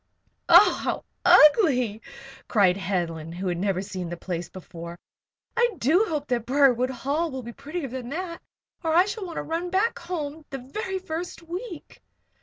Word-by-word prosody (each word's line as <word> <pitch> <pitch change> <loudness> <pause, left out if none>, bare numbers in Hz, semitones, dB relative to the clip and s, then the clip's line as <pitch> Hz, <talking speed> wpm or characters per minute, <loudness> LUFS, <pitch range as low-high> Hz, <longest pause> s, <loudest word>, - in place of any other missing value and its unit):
"Oh, 350 +4 +8
how - - -2 0.2
ugly!" 255 - +5 0.5
cried 195 -5 +4
Helen, 170 -5 -3
who 180 +3 -6
had 175 -1 -2
never 190 -1 0
seen 185 -3 -5
the 175 - -5
place 175 0 -5
before. 170 -2 -9 0.6
"I 475 0 +2
do 335 - +3
hope 300 -3 -2
that 235 -2 -1
Briarwood 255 -2 +4
Hall 280 +6 -1
will 260 -3 -6
be 235 +1 -8
prettier 300 +3 -5
than 250 -1 -6
that, 335 +3 -5 0.4
or 320 -1 +1
I 355 +2 +6
shall 405 -1 -5
want 335 - -8
to - - -3
run 335 +2 -3
back 390 +6 +1
home 320 -3 -5
the 275 - -5
very 380 - -4
first 350 -1 -6
week." 350 +1 -8
280 Hz, 170 wpm, -25 LUFS, -, 0.6 s, Oh